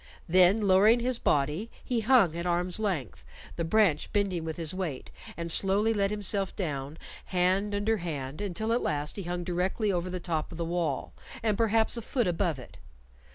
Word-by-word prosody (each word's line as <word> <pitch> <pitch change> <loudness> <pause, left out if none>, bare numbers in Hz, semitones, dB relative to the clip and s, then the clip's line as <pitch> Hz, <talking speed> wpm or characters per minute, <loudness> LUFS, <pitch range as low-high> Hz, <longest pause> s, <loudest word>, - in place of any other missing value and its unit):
Then 185 +5 +5
lowering 205 +4 +5
his 245 0 0
body, 150 +10 0
he 245 -2 -1
hung 220 -8 +4
at 170 +1 -3
arm's 175 +2 0
length, 175 - -3 0.3
the 170 - -2
branch 175 -3 +2
bending 195 -5 0
with 160 -1 -5
his 165 -1 -3
weight, 175 -8 -4 0.3
and 170 0 -2
slowly 200 +5 +3
let 200 -2 +1
himself 200 -1 -1
down 145 -4 -4 0.3
hand 190 +3 +1
under 215 +2 +1
hand, 150 -4 -5
until 210 +3 -2
at 240 - +1
last 150 -1 -2
he 200 - -4
hung 175 -1 -4
directly 185 +4 -1
over 180 0 -2
the 180 0 -4
top 165 -3 -3
of 165 - -8
the 170 - -2
wall, 165 -5 -2 0.3
and 215 -2 +2
perhaps 225 +1 +2
a - - -3
foot 240 +1 -1
above 175 -3 0
it. 125 - -12
185 Hz, 185 wpm, -28 LUFS, 165-210 Hz, 0.3 s, Then